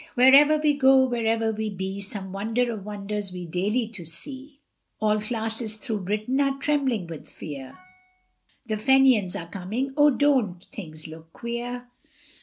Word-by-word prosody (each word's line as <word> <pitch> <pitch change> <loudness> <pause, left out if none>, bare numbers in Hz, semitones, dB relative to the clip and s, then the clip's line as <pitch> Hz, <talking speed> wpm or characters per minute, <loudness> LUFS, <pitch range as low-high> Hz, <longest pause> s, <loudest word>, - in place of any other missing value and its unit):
Wherever 275 +4 +7
we 300 -1 +3
go, 265 -1 +5
wherever 225 -2 0
we 220 0 -3
be, 190 0 -4
Some 195 -1 -5
wonder 225 +5 0
of 215 -4 -6
wonders 205 -1 -4
we 180 -1 -6
daily 200 +8 0
do 215 -5 -9
see; 270 - -6 0.4
All 215 0 +2
classes 220 0 -2
through 220 -2 -3
Britain 215 +7 0
are 275 -1 +1
trembling 270 -8 0
with 165 -2 -9
fear, 140 -4 -8 0.9
The 215 -2 -2
Fenians 255 -5 +4
are 170 - -4
coming, 215 +10 -3
oh, 295 0 +6
don't 255 -11 +1
things 155 -6 -8
look 160 +1 -12
queer? 245 +1 -5
220 Hz, 150 wpm, -25 LUFS, 195-260 Hz, 0.9 s, Wherever